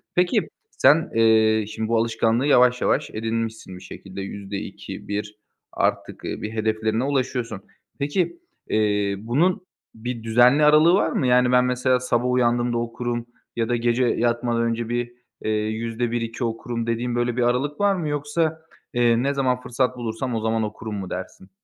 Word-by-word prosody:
Peki, 180 0 +2 0.2
sen, 155 +6 +4
eee, 110 -1 +4
şimdi 110 0 -4
bu 115 - +2
alışkanlığı 115 +3 +1
yavaş 125 -3 +4
yavaş 150 - +1
edinmişsin 110 -3 -3
bir 90 - -13
şekilde 95 +1 -9
%2-%1 100 +1 -6 0.3
artık, - - -2
eee, - - -4
bir 105 - -4
hedeflerine 110 +1 0
ulaşıyorsun. 125 -6 -2 0.4
Peki, 175 - -1 0.3
eee, 105 -2 +1
bunun 175 - 0 0.3
bir 115 0 -5
düzenli 125 +6 +5
aralığı 155 +3 +6
var 195 - +2
mı? 130 - 0
Yani, 125 0 +4
ben 125 0 +4
mesela 125 0 +1
sabah 125 0 0
uyandığımda 120 -1 +1
okurum 120 0 -3 0.3
ya 115 -1 -1
da 120 - +2
gece 120 +1 +1
yatmadan 120 0 +1
önce 115 0 -1
bir, 120 0 -2 0.3
eee, 110 - 0
%1-%2 115 +2 -2
okurum 115 0 -3
dediğin 120 +1 -1
böyle 120 0 0
bir - - +1
aralık 130 +5 0
var 200 -1 +3
mı? 170 -4 -3
Yoksa, 155 +2 -1 0.3
eee, 120 0 +3
ne 140 - +1
zaman 130 -2 0
fırsat 125 +1 -1
bulursam 120 +1 -3
o 110 - -1
zaman 110 0 0
okurum 110 0 -5
mu 95 -2 -5
dersin? 95 - -7
120 Hz, 160 wpm, -23 LUFS, 110-125 Hz, 0.4 s, aralığı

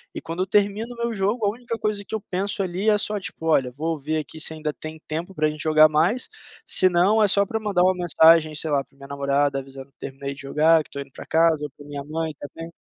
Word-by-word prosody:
e - - -3
quando 165 +2 -5
eu 190 - -1
termino 210 +4 0
o - - -19
meu 235 0 -2
jogo 210 +2 -1
a - - +3
única 235 0 -6
coisa 210 -1 -2
que 220 - -4
eu 215 - -4
penso 195 +2 -1
ali 190 +4 -1
é 210 - +4
só 210 0 -1
tipo: 165 -3 -8
"Olha, 135 -5 +3
vou 160 +5 -3
ver 155 +2 -3
aqui 155 +1 -8
se 160 - 0
ainda 155 -1 -3
tem 155 0 -9
tempo 170 +5 -5
para 155 0 +1
gente 155 - -8
jogar 155 0 +6
mais", 175 +12 +1 0.4
senão 185 +4 +4
é - - +4
só 200 +1 +3
para 220 +3 -3
mandar 200 -4 +1
uma 185 +1 +4
mensagem, 165 -2 +4
sei 155 0 -3
lá, 140 -1 +1
pra 135 - -31
minha 140 0 -12
namorada 140 0 0
avisando 135 0 -11
que - - -61
terminei 140 +1 -6
de 140 - -11
jogar, 155 +3 +3
que - - -20
estou 140 - -6
indo 135 - -24
para - - -10
casa 160 -2 +2
ou 145 - -8
para 145 - -13
minha 145 -1 -6
mãe 160 +2 -4
também. 165 +3 -9
160 Hz, 260 wpm, -23 LUFS, 150-200 Hz, 0.4 s, jogar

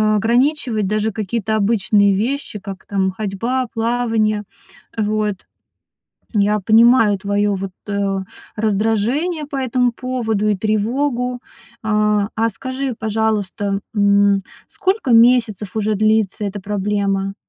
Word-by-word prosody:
ограничивать 235 -1 +1
даже 215 +1 0
какие-то 220 +1 -2
обычные 205 -1 +3
вещи, 235 0 -2
как 190 -1 -9
там 190 -2 0
ходьба, 225 +6 -2
плавание. 225 -2 0 0.5
Вот. 215 -1 0 1.0
Я 210 +1 +2
понимаю 225 0 +5
твоё 205 +1 0
вот, 195 0 -4 0.2
э, 200 -1 -1 0.4
раздражение 225 - 0
по 285 - -7
этому 250 -2 +1
поводу 230 -4 -2
и 210 -2 +1
тревогу. 245 +4 -1 0.4
А, 210 -1 +1
а 225 +1 +1
скажи, 260 +4 -4
пожалуйста, 205 -2 -1
м, 200 -1 +4 0.3
сколько 380 - -1
месяцев 230 -4 +3
уже 215 0 0
длится 215 -1 +1
эта 200 +1 -4
проблема? 195 0 -1
215 Hz, 110 wpm, -19 LUFS, 200-235 Hz, 1.0 s, понимаю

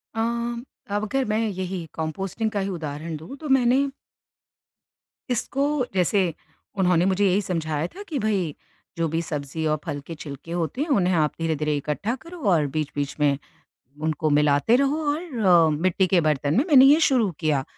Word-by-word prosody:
अ, - - -2 0.7
अब 205 - 0
अगर 265 +5 0
मैं 215 0 0
यही 185 -3 -4
कंपोस्टिंग 190 +7 -3
का 205 - -1
ही 195 0 -2
उदाहरण 160 -2 -5
दूँ। 160 - -9
तो 300 -1 -7
मैंने 260 0 +4 1.5
इसको, 275 +3 0
जैसे 185 -1 +2 0.4
उन्होंने 180 -2 +3
मुझे 195 +1 +2
यही 190 +2 +2
समझाया 160 -4 -2
था 405 - -10
कि 325 -9 -4
भई, 195 - -1 0.4
जो 165 -1 +1
भी 165 +2 -1
सब्जी 155 0 -4
और 155 -1 +1
फल 145 - -3
के 165 - -6
छिलके 145 +1 -9
होते 175 - -2
हैं, 315 - 0
उन्हें 185 -9 +2
आप 155 -2 +2
धीरे-धीरे 155 -2 0
इकट्ठा 150 - -2
करो 335 +6 -12
और 160 -5 +3
बीच-बीच 145 -2 -2
में, 145 -2 +3 0.6
उनको 155 0 0
मिलाते 145 +7 +3
रहो 280 +3 +2
और 300 +3 -2 0.2
अ, 175 -6 +5
मिट्टी 185 +1 +2
के 180 -2 +3
बर्तन 150 -2 +1
में 260 - +4
मैंने 270 -5 +8
ये 290 +4 +7
शुरू 255 -9 +3
किया। 150 -4 +1
180 Hz, 170 wpm, -24 LUFS, 155-225 Hz, 1.5 s, मैंने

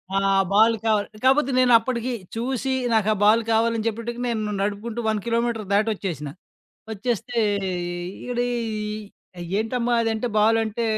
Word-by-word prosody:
ఆ - - +4 0.3
బాల్ 220 +3 +5
కావాలి. 215 -2 +2 0.2
కాపోతే 270 +1 +4
నేనప్పడికి 245 0 +3 0.2
చూసి 260 +3 -1 0.2
నాకా 215 -1 +3
బాల్ 215 +3 +5
కావాలని 225 0 +1
చెప్పటికి 230 +2 -4
నేను 215 -3 -2
నడుపుకుంటూ 210 +3 -3
1 215 -1 +1
కిలోమీటరు 230 -2 -1
దాటోచ్చేసినా. 195 -9 -1 0.6
వచ్చేస్తే 235 +2 -3 0.3
ఇ - - -2 0.6
ఇడ 240 - -2 1.2
ఏంటమ్మా 240 +2 -1
అదంటే 225 +1 -1
బాలంటే 225 +1 +2
225 Hz, 115 wpm, -23 LUFS, 215-240 Hz, 1.2 s, బాల్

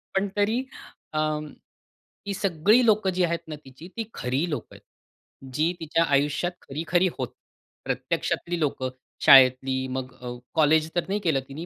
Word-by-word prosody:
पण 195 +1 +2
तरी 220 +5 +1 0.5
अं, 155 0 -1 0.8
ही 200 - -1
सगळी 200 +5 +3
लोकं 215 -3 +3
जी 180 0 0
आहेत 170 -1 0
ना 155 - -5
तिची 135 +6 -12
ती 225 - -2
खरी 135 +8 -1
लोकं 150 - -5
आहेत. - - -15 0.7
जी 160 +6 +1
तिच्या 165 +1 +1
आयुष्यात 145 +3 +1
खरी-खरी 170 +6 0
होत, 125 -3 -2 0.6
प्रत्यक्षातली 175 0 -2
लोकं. 135 -4 -1 0.4
शाळेतली 130 -1 +6
मग 130 0 -5
अ, 125 - -6 0.3
कॉलेज 155 0 +4
तर 175 - +1
नाही 200 +2 -1
केलं 160 -7 +1
तिनी 155 +5 -7
160 Hz, 150 wpm, -25 LUFS, 135-180 Hz, 0.8 s, शाळेतली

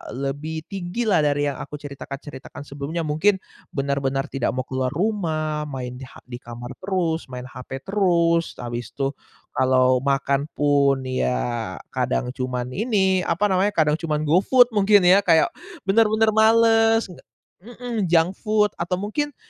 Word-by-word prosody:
lebih 145 +4 -4
tinggi 195 +4 -3
lah 200 -7 +3
dari 145 -1 +1
yang - - -9
aku 145 - -7
ceritakan-ceritakan 140 -1 -9
sebelumnya, 145 +4 -5
mungkin 160 +7 +2 0.4
benar-benar 135 0 -1
tidak 130 -2 -1
mau 130 - -1
keluar 130 -1 -2
rumah, 155 -6 -1
main 125 -2 -6
di 130 - -9
ha - - -16
di 120 -1 -9
kamar 120 +1 -9
terus, 180 -5 -1
main 125 -1 -7
HP 130 +1 -8
terus, 170 -4 +1
habis 120 0 -5
tuh 135 -1 -1 0.4
kalau 130 -1 +3
makan 140 +1 0
pun 140 -2 +2
ya 120 -5 -2 0.2
kadang 60 - -1
cuman 125 -1 -4
ini 190 - +1
apa 195 +5 +1
namanya, 190 +2 +1
kadang 155 -1 +2
cuman 155 -2 -2
GoFood 220 - +4
mungkin 205 -2 +4
ya 185 +3 +6
kayak 165 -5 +3 0.3
bener-bener 220 +2 +3
males 225 +1 +4 0.6
mhm, 235 -1 -4
junk 165 +1 +3
food 210 -2 +2
atau 175 +2 -1
mungkin 245 +10 -3
155 Hz, 145 wpm, -23 LUFS, 135-195 Hz, 0.6 s, ya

